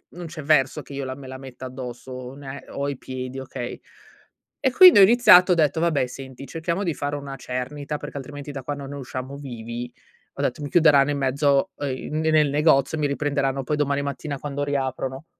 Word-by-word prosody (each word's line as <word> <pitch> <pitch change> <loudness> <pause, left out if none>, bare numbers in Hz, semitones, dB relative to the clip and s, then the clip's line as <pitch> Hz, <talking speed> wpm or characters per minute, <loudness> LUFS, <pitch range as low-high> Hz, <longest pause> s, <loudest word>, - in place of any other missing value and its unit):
non 175 -1 -7
c'è 160 -1 -8
verso, 140 -3 +2
che - - -12
io 140 0 -4
la 130 0 -5
me 135 -1 -11
la 130 0 -7
metta 130 -1 -10
addosso, 125 -1 -8
o 130 +1 -7
ne 140 -1 -8
o 140 - -3
ai 140 -2 -3
piedi, 130 0 -6
okay? 130 -2 -6 0.8
E, 265 - +1
quindi, 365 - +9
ho - - +10
iniziato, 190 -4 +7
ho - - +2
detto: 160 -1 +2
"Vabbè, 160 -6 +2
senti, 130 +1 -9
cerchiamo 170 +4 -2
di 170 -4 0
fare 145 0 -3
una 140 -1 -7
cernita, 135 +4 -4
perché, 145 - -8
altrimenti, 145 +1 -7
da 135 -2 -7
qua 145 - -3
non 140 -1 -8
ne 145 - -6
usciamo 130 0 -6
vivi." 120 -3 -6 0.4
Ho - - -6
detto: 125 - -1
"Mi 145 - -4
chiuderanno 145 -3 +5
in 145 - -1
mezzo" 140 +1 +2
ehm, 140 +2 -3
"n - - +1
nel 155 -2 +3
negozio, 150 0 +3
e - - -3
mi 145 - +2
riprenderanno, 140 -1 -1
poi, 150 - -1
domani 140 -1 0
mattina, 140 0 -4
quando 145 0 -3
riaprono." 135 0 -3
140 Hz, 215 wpm, -24 LUFS, 130-150 Hz, 0.8 s, ho